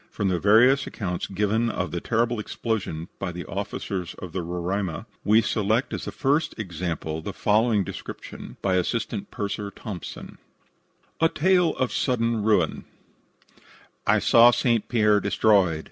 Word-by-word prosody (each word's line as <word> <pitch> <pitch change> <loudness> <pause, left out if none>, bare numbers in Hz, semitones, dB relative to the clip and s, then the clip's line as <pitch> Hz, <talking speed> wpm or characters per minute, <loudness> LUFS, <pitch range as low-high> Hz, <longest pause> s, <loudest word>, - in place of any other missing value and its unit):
From 100 -2 -1
the 90 -2 0
various 120 +8 +5
accounts 90 -5 -4
given 105 +4 0
of 95 -6 -3
the 85 - -3
terrible 120 0 0
explosion 105 -7 -3
by 95 - -3 0.2
officers 95 -2 -4
of 90 - -8
the 95 - -3
Roraima, 90 +1 -3 0.2
we 110 +3 +4
select 110 +3 0
as - - -4
a - - -3
first 145 +2 0
example 85 -5 -4
the 100 +4 -6
following 105 0 +2
description - - -8
by 95 -2 +2
Assistant 105 +2 -2
Purser 100 0 -4
Thompson: 100 -3 -8 0.8
A 165 - +4
TALE 180 +1 +2
OF 130 - -1
SUDDEN 115 -3 0
RUIN 105 -6 +1 1.2
"I - - +5
saw 120 +1 +6
St. 120 -2 +1
Pierre 105 -3 +4
destroyed. 95 -8 +3
105 Hz, 140 wpm, -25 LUFS, 95-115 Hz, 1.2 s, saw